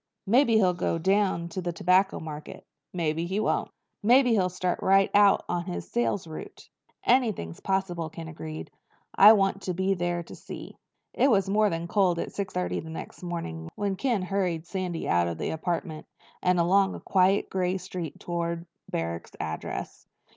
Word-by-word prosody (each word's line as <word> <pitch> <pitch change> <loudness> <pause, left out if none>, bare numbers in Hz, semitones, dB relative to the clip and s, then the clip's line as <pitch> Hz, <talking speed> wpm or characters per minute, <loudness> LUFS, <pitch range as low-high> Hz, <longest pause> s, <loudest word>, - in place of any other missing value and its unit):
Maybe 235 +3 +4
he'll 190 -4 +4
go 175 -1 -1
down 190 -1 +1
to 185 +3 -4
the 175 -1 -2
Tobacco 185 +3 +2
Mart. 155 -1 -7 0.4
Maybe 165 -1 -1
he 190 +3 -1
won't." 215 - 0 0.3
"Maybe 245 +3 +5
he'll 190 -5 +3
start 180 0 -2
right 195 0 +4
out 205 -1 +5
on 175 -1 -2
his 180 - -6
sales 235 -6 0
route." 160 -1 -9 0.4
"Anything's 220 - +1
possible," 185 -4 -1
Ken 165 +1 -8
agreed. 155 -1 -7 0.4
"I 205 - +9
just 220 - +8
want 195 0 +1
to 180 -2 -3
be 190 +2 +1
there 175 -1 -1
to - - -11
see." - - -9 0.4
It 275 - +3
was 195 -4 +2
more 210 +1 +4
than 165 -1 -3
cold 185 -2 +2
at - - -4
six 195 -2 -3
thirty 90 0 -2
the 160 - -8
next 160 - -8
morning 125 - -5
when 200 -1 -1
Ken 235 -3 0
hurried 185 -4 -1
Sandy 180 -2 -3
out 85 0 +3
of 85 -1 -3
the - - -2
apartment 160 -1 -3 0.3
and 180 -1 +2
along 190 +3 +3
quiet 190 +1 +2
gray 185 0 0
streets 180 -3 -6
toward 170 -1 -3 0.2
Barrack's 85 0 -4
address. 80 0 -5
180 Hz, 175 wpm, -27 LUFS, 165-195 Hz, 0.4 s, I